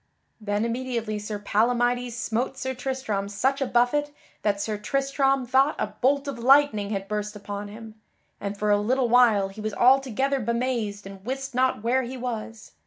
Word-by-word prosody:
Then 210 0 -1
immediately 235 -3 -2
Sir 210 0 -4
Palamydes 240 +4 +1
smote 240 +3 -2
Sir 260 0 -3
Tristram 250 -6 -3
such 265 +7 0
a 270 - +1
buffet 245 +5 +2 0.3
that 200 -1 0
Sir 215 +1 -2
Tristram 275 +2 +1
thought 265 +4 +3
a 210 - -3
bolt 280 +2 +2
of 275 -4 -4
lightning 255 -5 +4
had 195 -2 -3
burst 210 0 -3
upon 205 0 -6
him, 220 +1 -10 0.5
and 200 0 -4
for 210 0 +1
a 205 - +4
little 250 +3 +1
while 225 -5 +5
he 205 +2 -10
was 215 -1 -3
altogether 270 +2 +3
bemazed 235 -3 -2
and 195 -1 -10
wist 265 +3 -4
not 255 -3 +1
where 250 +3 +2
he 255 +1 -6
was. 230 -3 -6
235 Hz, 175 wpm, -25 LUFS, 210-260 Hz, 0.5 s, while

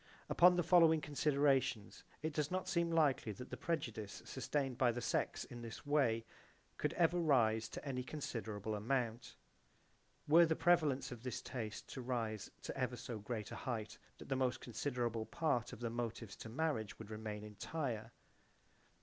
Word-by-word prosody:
Upon 180 +1 +7
the 175 - +2
following 165 -2 +6
considerations 140 -6 +1 0.2
it 155 0 -1
does 150 -1 0
not 185 +1 -2
seem 170 -1 +1
likely 150 -9 +3
that 125 +6 -9
the - - -2
prejudice 115 - -3
sustained 135 -4 -1
by 125 -2 +5
the 120 - -3
sex - - 0
in 120 - -9
this 115 +3 -8
way 130 -6 +2 0.5
could - - 0
ever 175 0 +3
rise 115 -9 +3
to - - -7
any 130 -2 -1
considerable 110 -7 -4
amount. 115 +1 -1 0.9
Were 165 +3 +7
the 160 - +2
prevalence 160 -7 +3
of 120 -2 -7
this 125 -2 -3
taste 110 -4 -5
to 130 - -5
rise 115 -4 -2
to - - -4
ever - - -1
so 115 -3 -5
great 105 0 -4
a - - -4
height 110 -4 -4 0.2
the 135 - -3
most 130 -1 +1
considerable 120 -2 -2
part 125 -7 0
of - - -9
the 115 -1 -1
motives 115 -3 -4
to 115 - -8
marriage 120 -4 -1
would 110 -1 -9
remain 105 -1 -5
entire. 115 +1 -4
125 Hz, 165 wpm, -38 LUFS, 110-150 Hz, 0.9 s, Upon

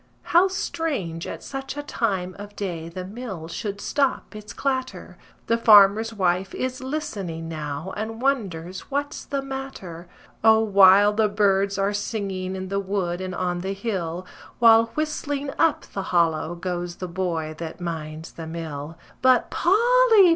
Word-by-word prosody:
How 350 +3 +7
strange 285 - -3
at - - -7
such 270 +1 -6
a 290 - -3
time 190 -10 -2
of 205 0 -9
day 170 -5 -4
the 180 +2 -6
mill 195 -5 -7
should 200 +4 -5
stop 275 -2 -1
its 210 -1 -8
clatter! 260 0 -3 0.3
The 230 0 +1
farmer's 215 0 +7
wife 185 -2 0
is 255 0 -3
listening 200 - -4
now 155 +2 -5
and 220 +2 -4
wonders 190 -10 -2
what's 285 +1 -2
the 275 -1 -3
matter. 265 -11 -7 0.4
O, 220 0 +7
wild 205 -1 +6
the 220 -1 +3
birds 200 -1 +2
are 200 +1 +1
singing 195 -3 -3
in 185 0 -5
the 200 0 0
wood 185 -3 -2
and 185 -1 -4
on 180 -1 -1
the 190 +2 -3
hill, 185 -5 -3 0.3
While 230 -1 +6
whistling 290 -2 -2
up 325 - +3
the 195 - -2
hollow 170 -1 +1
goes 175 0 -4
the 185 - -5
boy 170 -3 -2
that 165 0 -6
minds 160 -2 -5
the 165 -1 -8
mill. 160 -1 -6 0.2
But 255 -2 +4
Polly! 450 0 +5
195 Hz, 155 wpm, -24 LUFS, 175-250 Hz, 0.4 s, How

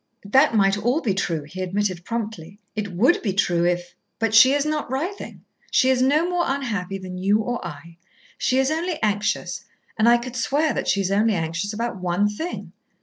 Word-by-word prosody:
"That 265 +5 +4
might 195 -1 +3
all 245 +8 +1
be 220 -10 0
true," 165 -5 -2
he 165 +6 -8
admitted 185 -1 -2
promptly. 205 -5 -5 0.2
"It 205 -2 -3
would 235 - +3
be 200 -5 -1
true 175 -3 +1
if 175 0 -1 0.2
but 225 -1 -1
she 255 +4 +8
is 290 0 0
not 305 -3 -2
writhing. 330 +10 -5 0.2
She 260 - +3
is 255 -1 +1
no 295 +6 +3
more 355 -1 0
unhappy 210 -9 -2
than 185 -1 -7
you 200 +3 +3
or 245 +2 -3
I. 170 0 -9 0.4
She 255 - +1
is 265 +2 +2
only 330 +1 -1
anxious, 205 -2 -1 0.4
and 225 +2 +5
I 240 - +6
could 245 +1 -7
swear 290 +5 +1
that - - -3
she 200 - +2
is 190 0 -1
only 210 +2 +2
anxious 165 +4 -2
about 230 -1 -3
one 180 +3 +1
thing. 315 +13 -5
210 Hz, 200 wpm, -23 LUFS, 185-260 Hz, 0.4 s, she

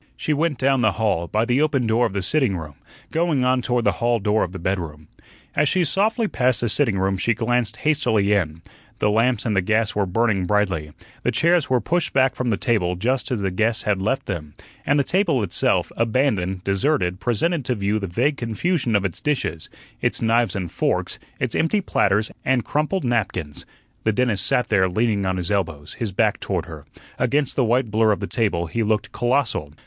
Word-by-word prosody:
She 155 - -1
went 150 -1 0
down 135 0 +2
the 110 -3 +3
hall, 100 -6 0
by 110 +5 0
the 125 +3 +1
open 145 -5 +1
door 115 +2 +2
of - - -9
the 100 -2 -2
sitting 125 -4 +1
room, 80 -3 -8 0.4
going 160 -6 +1
on 130 0 +2
toward 120 -1 0
the - - +4
hall 120 0 +2
door 105 +1 +1
of 90 - -4
the 95 - -7
bedroom. 85 -5 -4 0.5
As 150 - +3
she 185 - +2
softly 215 - +1
passed 125 - +1
the 120 - 0
sitting 115 -4 +2
room 95 0 0
she 115 +4 +1
glanced 115 -1 0
hastily 115 -10 +2
in. 85 -5 -1 0.3
The 105 - +1
lamps 115 +1 +1
and 110 -3 0
the 95 - +3
gas 110 +3 +1
were 100 -2 0
burning 100 -1 +1
brightly, 95 -7 0 0.3
the - - 0
chairs 170 -2 +2
were 130 -1 +3
pushed 175 +5 -1
back 130 -1 +3
from 125 -1 -2
the 105 - +1
table 90 -7 0
just 125 +9 -1
as 125 -6 -2
the 95 -1 -1
guests 110 +5 0
had 100 -3 0
left 135 +7 -1
them, 75 -7 -5 0.3
and 145 +1 +3
the - - +3
table 165 - +1
itself, 90 - 0
abandoned, 110 -6 0
deserted, 95 -2 0
presented 145 - 0
to 125 - 0
view 105 +1 0
the 100 - -4
vague 140 - 0
confusion 120 - -1
of 100 -1 +2
its 95 - -4
dishes, 130 - -2 0.3
its - - +1
knives 115 -3 +1
and 90 -4 -4
forks, - - -1 0.2
its - - -2
empty 185 +6 +1
platters 105 - +1
and 130 -2 +1
crumpled 155 +6 -1
napkins. 100 - -2 0.4
The 110 - +1
dentist 110 -4 +1
sat 125 - +1
there 95 -3 +3
leaning 105 0 0
on 95 0 -1
his 90 0 -2
elbows, 85 -7 -2
his 115 -5 -4
back 105 +2 +1
toward 90 -4 -2
her; 80 -5 -11 0.3
against 140 +2 0
the 135 - +2
white 120 0 +1
blur 110 0 +3
of 100 - 0
the 100 - -3
table 100 -7 0
he 85 +8 -3
looked 110 0 0
colossal. 120 - -1
110 Hz, 205 wpm, -22 LUFS, 95-130 Hz, 0.5 s, the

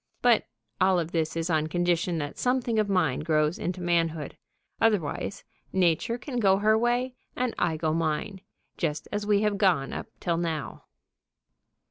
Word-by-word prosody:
But 240 -3 +4 0.3
all 185 0 +4
of 170 -1 -2
this 160 -2 -1
is 165 +1 -1
on 155 -1 +2
condition 175 0 0
that 145 -2 -4
something 245 -3 +1
of 210 -1 +1
mine 165 -9 +2
grows 155 0 +1
into 180 +1 -3
manhood. 165 -4 0 0.5
Otherwise, 205 -4 0 0.3
Nature 185 +5 +1
can 245 -1 -4
go 195 -3 +4
her 215 +2 +3
way 240 +3 +1 0.2
and 250 -1 -1
I 160 -2 +1
go 155 0 0
mine, 165 +4 -1 0.4
just 155 -3 -2
as 205 0 -2
we 205 0 +3
have 205 -2 0
gone 170 -9 +2
up - - -5
till 170 -1 0
now. 165 -4 -3
175 Hz, 160 wpm, -27 LUFS, 160-210 Hz, 0.5 s, But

